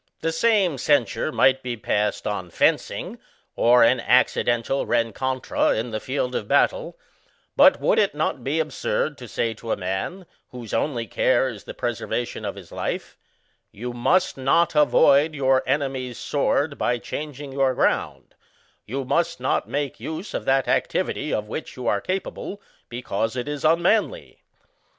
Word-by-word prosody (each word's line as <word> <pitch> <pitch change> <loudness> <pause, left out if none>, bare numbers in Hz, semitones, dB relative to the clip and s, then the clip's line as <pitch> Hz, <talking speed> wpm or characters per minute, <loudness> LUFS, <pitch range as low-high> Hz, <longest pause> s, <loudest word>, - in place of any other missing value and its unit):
The 165 - 0
same 190 - +2
censure 145 +2 +1
might 130 -3 +3
be 125 -2 -4
passed 105 -1 -1
on 95 -4 -3
fencing, - - 0 0.4
or 120 +1 +5
an 125 +2 +4
accidental 120 +1 +2
rencontre 120 +3 0
in 115 +2 -3
the 110 - -2
field 130 +1 -2
of 105 - -3
battle; - - +1 0.6
but - - +6
would - - +2
it - - +1
not - - -2
be 145 +4 0
absurd 155 0 -1
to 125 - -9
say 115 +1 -1
to 110 +1 -7
a - - 0
nran, 95 - -4 0.2
whose 120 -4 -9
only 120 -6 -1
care 130 +3 +2
is 105 -4 -10
the - - -8
preserva 120 0 -2
tion - - -8
of - - -4
his - - -12
life, - - -4
ŌĆö - - -40
"You 120 +1 -4
must 180 +10 +1
not 135 +6 +2
avoid 150 0 +4
your 135 -2 +3
enemy's 135 -4 -1
sword 145 0 0
by 120 - +1
changing 145 +2 -6
your 135 -1 +1
ground; - - -1 0.5
you 135 +4 -3
must 170 +5 0
not 130 - -1
make 145 -1 -3
use 160 +6 -6
of - - -3
that 135 0 +2
activity - - -1
of 105 0 -2
which 130 - -6
you 125 - -6
are 100 - +1
capable, 195 +1 -4 0.3
because 115 -1 -3
it 125 +2 -3
is 145 -1 -4
unmanly." 175 - +1
130 Hz, 160 wpm, -23 LUFS, 120-150 Hz, 0.6 s, but